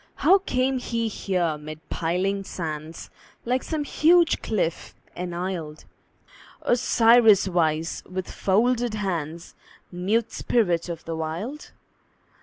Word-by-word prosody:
How 380 +5 +5
came 260 -7 0
he 230 -2 -2
here 180 -7 -1
mid 155 +1 -8
piling 185 +4 -1
sands, 160 -3 -6 0.3
Like 250 +2 +1
some 310 -2 -3
huge 335 +3 +3
cliff 185 -6 -2 0.2
enisled, 175 -3 -5 0.8
Osiris 230 -4 +5
wise, 165 -2 0
with 185 0 -5
folded 235 +3 +1
hands, 170 -5 -4 0.4
Mute 205 +6 0
spirit 175 -7 0
of 170 -1 -6
the 165 - -4
Wild? 170 - -5
190 Hz, 105 wpm, -25 LUFS, 165-235 Hz, 0.8 s, How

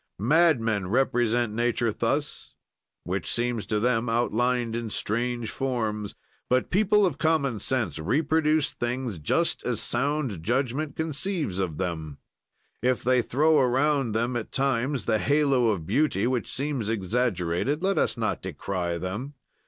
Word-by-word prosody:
"Madmen 115 - +2
represent 120 -1 +1
nature 120 0 +1
thus, - - -2 0.5
which 90 +1 -3
seems 120 -4 -1
to 105 0 0
them 115 0 +1
outlined 120 0 +1
in 115 -1 -3
strange 120 +2 -1
forms. 110 -6 -2 0.3
"But 130 0 +1
people 210 +2 +4
of 155 -6 -2
common 140 -8 +1
sense 110 - -1
reproduce 155 - +1
things 120 -5 -3
just 75 - 0
as - - -1
sound 135 - -1
judgment 135 - -1
conceives 160 - -2
of 85 -6 -2
them; 80 -6 -4 0.6
if 125 0 +1
they 125 0 +3
throw 155 +6 +3
around 135 -1 +2
them 120 +3 0
at 120 -3 -4
times 135 -1 0
the 110 - +2
halo 140 -4 +3
of 100 -8 0
beauty 145 - +1
which 125 -3 -1
seems 135 -6 -2
exaggerated, 110 - 0
let 195 +1 +2
us - - 0
not - - -1
decry 90 -3 -3
them. 105 - -5
120 Hz, 135 wpm, -26 LUFS, 105-140 Hz, 0.6 s, people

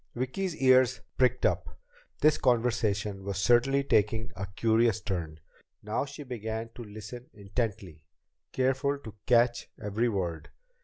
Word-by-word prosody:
Vicki's 155 +9 -2
ears 130 -2 +4
pricked 125 -1 +2
up. - - -1 0.4
This 150 0 +4
conversation 110 -5 +1
was 100 -2 -3
certainly 120 +7 +3
taking 110 -2 +1
a 100 +2 -4
curious 110 +3 +2
turn! 85 -7 -4 0.4
Now 105 +6 -1
she 145 +1 -9
began 115 -3 -5
listening 110 +2 -9
intently, 100 -6 -4 0.5
careful 135 +2 +1
to 110 -7 -10
catch 120 0 +3
every 110 +4 0
word. 90 -6 -3
115 Hz, 120 wpm, -29 LUFS, 100-125 Hz, 0.5 s, ears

